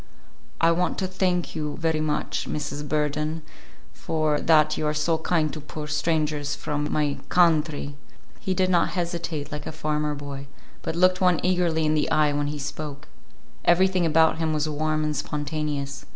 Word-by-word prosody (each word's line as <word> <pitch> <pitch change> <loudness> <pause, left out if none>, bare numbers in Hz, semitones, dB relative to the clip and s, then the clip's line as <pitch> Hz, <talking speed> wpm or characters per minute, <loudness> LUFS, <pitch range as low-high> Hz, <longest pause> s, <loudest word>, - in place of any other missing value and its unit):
"I 165 0 +5
want 180 +2 0
to 190 - 0
thank 185 -2 0
you 150 -2 -3
very 160 -2 0
much, 150 -1 -1
Mrs. 150 -1 -4
Burden, 150 +1 -1 0.5
for 155 -2 0
that 155 -1 +4
you 155 - -1
are 150 - 0
so 160 +2 +1
kind 160 -2 +1
to 155 - -6
poor 150 +1 -7
strangers 150 -1 0
from 150 0 -2
my 150 -2 0
kawn 170 -4 +5
tree." 145 -2 -6 0.4
He 190 - -1
did 185 0 +2
not 175 -2 +3
hesitate 170 -4 -3
like 150 -1 -5
a - - -3
farmer 150 -1 -1
boy, 140 -1 -7 0.3
but - - -3
looked 185 +2 +3
one 180 -3 +4
eagerly 175 -3 +2
in 155 - +2
the 155 - +1
eye 150 -1 +3
when 145 0 0
he 150 +1 -3
spoke. 150 0 -6 0.5
Everything 185 +1 +4
about 160 0 +4
him 160 -1 0
was 155 0 0
warm 155 0 0
and 150 0 -1
spontaneous. 145 -2 -3
155 Hz, 175 wpm, -25 LUFS, 150-165 Hz, 0.5 s, I